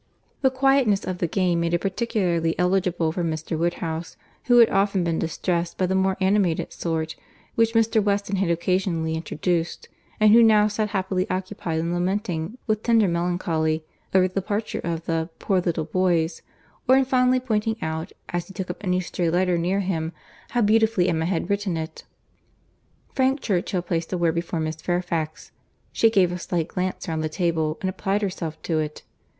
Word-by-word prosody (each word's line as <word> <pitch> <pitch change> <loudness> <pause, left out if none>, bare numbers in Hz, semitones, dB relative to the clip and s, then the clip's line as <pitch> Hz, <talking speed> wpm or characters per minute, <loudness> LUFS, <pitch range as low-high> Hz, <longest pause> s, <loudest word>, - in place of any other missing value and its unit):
The 265 - +5
quietness 260 -6 +2
of 185 -1 -4
the 170 - +1
game 175 0 +1
made 170 0 +1
it 170 - -1
particularly 185 -5 0
eligible 180 -3 +1
for 175 +2 -2
Mr. 160 0 -2
Woodhouse, 165 0 -2 0.3
who 245 -1 +5
had 235 -2 +7
often 195 -1 +2
been 165 -1 0
distressed 170 +1 -2
by 185 - +2
the 185 - 0
more 190 0 +1
animated 190 -3 +1
sort, 160 -1 -2 0.4
which 230 0 +2
Mr. 225 -1 +3
Weston 200 -1 0
had 190 -2 +1
occasionally 170 -1 0
introduced, 165 +1 -2 0.3
and 215 0 +6
who 235 - +8
now 215 -2 +6
sat 210 0 -1
happily 190 -2 -1
occupied 185 -3 -3
in 165 +2 -1
lamenting, 180 +1 -2
with 215 -2 0
tender 225 -3 +3
melancholy, 170 -2 0 0.3
over 185 -1 +4
the 185 - -13
departure 205 +3 -2
of 165 -1 -3
the 165 0 -1
"poor 190 -2 +1
little 165 -3 -1
boys," 170 -1 +1 0.5
or 260 - +7
in 270 - +3
fondly 255 0 +3
pointing 220 -3 0
out, 160 0 -3 0.2
as 175 -1 -3
he 190 - -13
took 185 -3 -3
up 180 - -11
any 180 -1 +1
stray 175 -1 -1
letter 180 +1 +2
near 180 +4 0
him, 165 -4 -2 0.4
how 245 - +1
beautifully 220 -3 +3
Emma 160 -1 0
had 175 -1 -1
written 200 -4 -1
it. 160 0 -6 1.1
Frank 265 +1 +2
Churchill 185 -4 -1
placed 165 -2 -2
a 185 - 0
word 170 -2 +2
before 170 0 -2
Miss 155 0 -2
Fairfax. 170 -2 -3 0.4
She 225 - +4
gave 190 -5 +3
a 180 - -4
slight 170 -2 -2
glance 185 +1 -3
round 160 -1 -2
the 155 - -1
table, 160 -2 0
and 190 - -1
applied 195 +2 -1
herself 175 -5 -3
to 160 -2 0
it. 150 -1 -4
180 Hz, 180 wpm, -24 LUFS, 165-205 Hz, 1.1 s, who